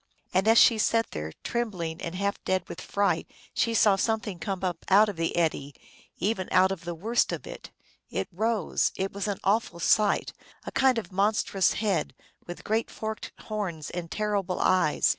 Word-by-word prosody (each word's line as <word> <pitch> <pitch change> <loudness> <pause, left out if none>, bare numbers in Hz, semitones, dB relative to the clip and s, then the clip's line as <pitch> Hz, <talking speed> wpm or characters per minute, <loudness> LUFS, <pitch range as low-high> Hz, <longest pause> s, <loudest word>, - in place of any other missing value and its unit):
And 190 +3 +2
as 225 +1 +6
she 225 -1 +6
sat 230 +1 +2
there, 75 0 -5
trembling 180 -9 -3
and 170 +1 -5
half 200 +2 -2
dead 185 -1 0
with - - -7
fright, 200 0 0 0.2
she 230 -1 +1
saw 205 -2 +5
Something 210 -3 -1
come 195 0 -4
up 175 -3 -2
out 205 +3 +6
of 205 - -5
the 165 0 -1
eddy, 145 -4 0 0.4
even 195 -2 -1
out 185 +1 +5
of 180 -3 -5
the 175 0 -4
worst 225 +8 +1
of - - -5
it. - - -9 0.4
It - - -2
rose; 215 0 0
it 195 +1 -3
was 200 +1 -3
an 200 -2 -1
awful 200 -3 +1
sight, 210 +4 +2 0.3
a - - -5
kind 265 -2 +3
of 225 - -4
monstrous 195 -1 +2
head, 205 -5 -1 0.3
with 175 - -8
great 220 +2 0
forked 220 0 -5
horns 190 -8 -4
and 175 -2 -5
terrible 205 -3 -1
eyes. 185 -5 +3
195 Hz, 180 wpm, -27 LUFS, 175-215 Hz, 0.4 s, as